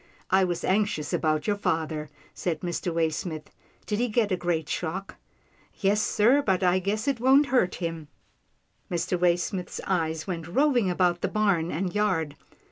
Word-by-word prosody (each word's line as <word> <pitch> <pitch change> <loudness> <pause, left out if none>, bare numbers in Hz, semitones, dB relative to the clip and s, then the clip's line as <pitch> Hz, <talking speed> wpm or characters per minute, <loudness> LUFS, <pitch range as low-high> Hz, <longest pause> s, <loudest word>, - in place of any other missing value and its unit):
" - - -28
I 190 +1 +5
was 175 -1 -1
anxious 195 -5 0
about 155 -1 +1
your 205 - +1
father," 160 -5 -2 0.2
said 165 -4 -3
Mr. 175 0 -2
Waysmith. 160 -1 -2 0.3
"Did 210 0 -2
he 245 - +2
get 215 -2 +1
a - - +3
great 170 -3 -1
shock?" 185 +4 -4 0.3
" - - -34
Yes 205 +1 +2
sir, 240 +7 +3
but 190 -7 +1
I 180 +1 +3
guess 205 +5 -2
it 275 -4 +1
won't 265 +4 +5
hurt 185 -8 +3
him." 165 -3 -4 0.8
Mr. 175 0 -1
Waysmith's 180 +1 0
eyes 160 -4 -1
went 170 -4 -4
roving 245 - +2
about 175 -1 +1
the - - +1
barn 195 -6 +1
and 180 +3 -2
yard. 180 -8 0
180 Hz, 170 wpm, -26 LUFS, 165-210 Hz, 0.8 s, I